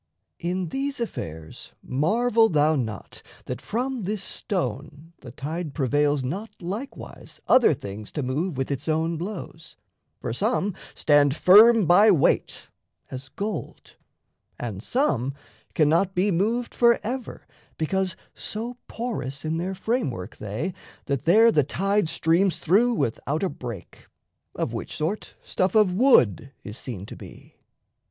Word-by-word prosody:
In 180 Hz, 0 st, -2 dB
these 275 Hz, -, -3 dB
affairs 80 Hz, -, -6 dB
Marvel 225 Hz, -, +2 dB
thou 155 Hz, 0 st, +3 dB
not 110 Hz, -7 st, -5 dB, 0.2 s
that -, -, -5 dB
from 250 Hz, +3 st, -2 dB
this 200 Hz, +1 st, -3 dB
stone 150 Hz, -, -4 dB
the 125 Hz, -, -11 dB
tide 150 Hz, +5 st, -5 dB
Prevails 145 Hz, 0 st, +1 dB
not 195 Hz, -, -4 dB
likewise 200 Hz, +10 st, -7 dB
other 255 Hz, -7 st, +6 dB
things 100 Hz, -2 st, -8 dB
to 150 Hz, -, -2 dB
move 145 Hz, +5 st, -2 dB
With 135 Hz, +1 st, -2 dB
its 140 Hz, +3 st, -3 dB
own 160 Hz, +2 st, +1 dB
blows: 170 Hz, -2 st, -7 dB, 0.4 s
for -, -, -4 dB
some 205 Hz, -, 0 dB, 0.2 s
stand 145 Hz, -2 st, +4 dB
firm 215 Hz, +5 st, +7 dB
by 200 Hz, +6 st, +6 dB
weight, 175 Hz, -9 st, +2 dB, 0.4 s
As 130 Hz, 0 st, -7 dB
gold; 205 Hz, +7 st, -6 dB, 0.6 s
and 105 Hz, -5 st, -5 dB
some 135 Hz, -, 0 dB, 0.4 s
cannot 165 Hz, +5 st, +3 dB
be 195 Hz, +3 st, +2 dB
moved 225 Hz, +7 st, 0 dB
forever, 235 Hz, +1 st, +1 dB, 0.3 s
Because 185 Hz, +3 st, -1 dB, 0.2 s
so 235 Hz, +3 st, -6 dB
porous 155 Hz, -, -4 dB
in 160 Hz, +1 st, -1 dB
their 185 Hz, +3 st, -3 dB
framework 185 Hz, -, -2 dB
they 110 Hz, -, -4 dB, 0.3 s
That 140 Hz, -3 st, -2 dB
there 225 Hz, +7 st, +6 dB
the 150 Hz, -, +3 dB
tide 195 Hz, +5 st, 0 dB
streams 170 Hz, +2 st, +2 dB
through 215 Hz, +9 st, +3 dB
without 140 Hz, -, -1 dB
a 190 Hz, -, +1 dB
break, 120 Hz, -8 st, -9 dB, 0.5 s
Of -, -, -2 dB
which -, -, -5 dB
sort 165 Hz, +8 st, -3 dB
stuff 185 Hz, +2 st, -1 dB
of 210 Hz, -4 st, +5 dB
wood 160 Hz, -, +4 dB
is 105 Hz, -, -8 dB
seen 100 Hz, -7 st, -6 dB
to -, -, -9 dB
be. -, -, -14 dB
170 Hz, 135 wpm, -25 LUFS, 140-210 Hz, 0.6 s, firm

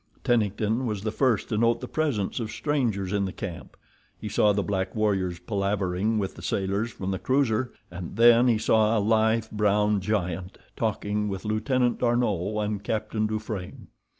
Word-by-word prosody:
Tennington 110 Hz, 0 st, +1 dB
was 105 Hz, -3 st, -3 dB
the 110 Hz, -, -1 dB
first 120 Hz, -3 st, +1 dB
to 105 Hz, -3 st, 0 dB
note 115 Hz, 0 st, +3 dB
the 125 Hz, -, -6 dB
presence 135 Hz, -10 st, -1 dB
of 115 Hz, -2 st, -3 dB
strangers 115 Hz, -12 st, -1 dB
in 100 Hz, -1 st, +1 dB
the 95 Hz, -, -3 dB
camp. 85 Hz, -, -7 dB, 0.4 s
He -, -, -5 dB
saw 105 Hz, -, +3 dB
the 100 Hz, 0 st, 0 dB
black 95 Hz, -2 st, -2 dB
warriors 95 Hz, -5 st, 0 dB
palavering 100 Hz, 0 st, -1 dB
with 100 Hz, -2 st, -2 dB
the -, -, -12 dB
sailors 100 Hz, +4 st, -1 dB
from 95 Hz, -2 st, -4 dB
the 95 Hz, -, -2 dB
cruiser, 130 Hz, -3 st, +1 dB, 0.2 s
and 90 Hz, +1 st, -7 dB
then 120 Hz, +2 st, +6 dB
he 115 Hz, -3 st, +4 dB
saw 110 Hz, +1 st, +3 dB
a -, -, +3 dB
lithe, 110 Hz, +1 st, +2 dB
brown 105 Hz, 0 st, +2 dB
giant 95 Hz, -2 st, -2 dB, 0.2 s
talking 105 Hz, -1 st, -1 dB
with 95 Hz, -1 st, -5 dB
Lieutenant 120 Hz, +3 st, +1 dB
D'Arnot 105 Hz, -4 st, 0 dB
and 105 Hz, -1 st, -3 dB
Captain 110 Hz, 0 st, -1 dB
Dufranne. 110 Hz, -3 st, -5 dB
105 Hz, 170 wpm, -26 LUFS, 100-115 Hz, 0.4 s, then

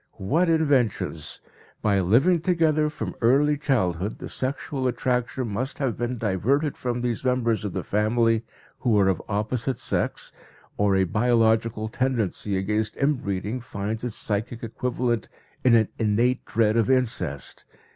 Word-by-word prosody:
What 160 Hz, -, +1 dB
inventions! 145 Hz, -9 st, 0 dB, 0.4 s
By 100 Hz, -2 st, +3 dB
living 135 Hz, -, +3 dB
together 160 Hz, -3 st, +2 dB
from 155 Hz, -, -5 dB
early 140 Hz, +5 st, +4 dB
childhood 105 Hz, -, 0 dB
the -, -, -7 dB
sexual 130 Hz, 0 st, -2 dB
attraction 125 Hz, 0 st, -1 dB
must 125 Hz, +7 st, -3 dB
have 135 Hz, -5 st, -1 dB
been 120 Hz, +1 st, -2 dB
diverted 120 Hz, -, 0 dB
from 120 Hz, -1 st, -3 dB
these 120 Hz, 0 st, -2 dB
members 125 Hz, -4 st, +1 dB
of 105 Hz, -, -3 dB
the -, -, -3 dB
family 115 Hz, +2 st, +2 dB, 0.4 s
who 115 Hz, -5 st, +2 dB
are 100 Hz, -1 st, +4 dB
of 95 Hz, -, 0 dB
opposite 115 Hz, +5 st, -1 dB
sex, -, -, -2 dB, 0.4 s
or 100 Hz, -1 st, +2 dB
a 95 Hz, -, +3 dB
biological 110 Hz, +2 st, +2 dB
tendency 110 Hz, -5 st, -1 dB
against 105 Hz, +3 st, -1 dB
in 140 Hz, +2 st, +2 dB
breeding 100 Hz, +5 st, -3 dB
finds 110 Hz, 0 st, -4 dB
its 120 Hz, -3 st, -3 dB
psychic 110 Hz, +3 st, -2 dB
equivalent 120 Hz, -1 st, -2 dB, 0.3 s
in 125 Hz, -2 st, +6 dB
an 110 Hz, -2 st, +3 dB
innate 115 Hz, +3 st, +1 dB
dread 110 Hz, -1 st, +2 dB
of 115 Hz, +2 st, +2 dB
incest! 110 Hz, -, -1 dB
115 Hz, 145 wpm, -25 LUFS, 105-130 Hz, 0.4 s, in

